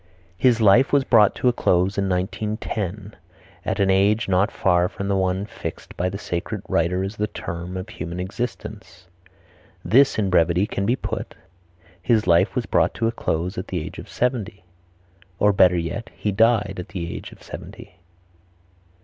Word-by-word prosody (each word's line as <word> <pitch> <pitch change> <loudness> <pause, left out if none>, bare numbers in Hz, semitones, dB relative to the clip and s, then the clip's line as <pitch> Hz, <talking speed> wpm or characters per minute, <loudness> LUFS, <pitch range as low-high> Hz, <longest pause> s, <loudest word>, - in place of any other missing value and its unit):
"His 120 +4 +3
life 115 +5 +5
was 140 -1 +4
brought 110 -6 +4
to - - 0
a 125 - +4
close 95 -3 +1
in 100 -1 0
1910 105 +1 -3 0.5
at - - -2
an 95 -1 +3
age 100 +4 +3
not 95 +3 +2
far 90 -1 +2
from 100 - -5
the 100 - +2
one 95 +1 0
fixed - - -8
by 90 +1 -1
the 95 - -5
sacred 85 -3 -4
writer 90 +3 +1
as 100 +2 -5
the 105 - 0
term 85 -1 -6
of 95 +2 -5
human 85 -5 -6
existence." 95 -3 -6 0.8
This 135 +4 +4
in 100 -3 0
brevity 85 +2 +3
can 100 -1 -3
be 120 - +3
put, - - -5 0.7
"His 110 +2 +2
life 90 +3 +3
was 125 - -1
brought - - +1
to 115 - -1
a - - +1
close 90 -4 -2
at 90 - -6
the 90 - -2
age 75 - -7
of - - -10
seventy;" 115 -6 -2 0.7
or, 105 +1 +3
better 90 -2 +5
yet, 115 +8 -4
"He 105 - -2
died 110 0 +2
at 90 - -6
the 85 -2 -5
age - - -8
of - - -16
seventy." 90 - -10
100 Hz, 175 wpm, -23 LUFS, 90-110 Hz, 0.8 s, life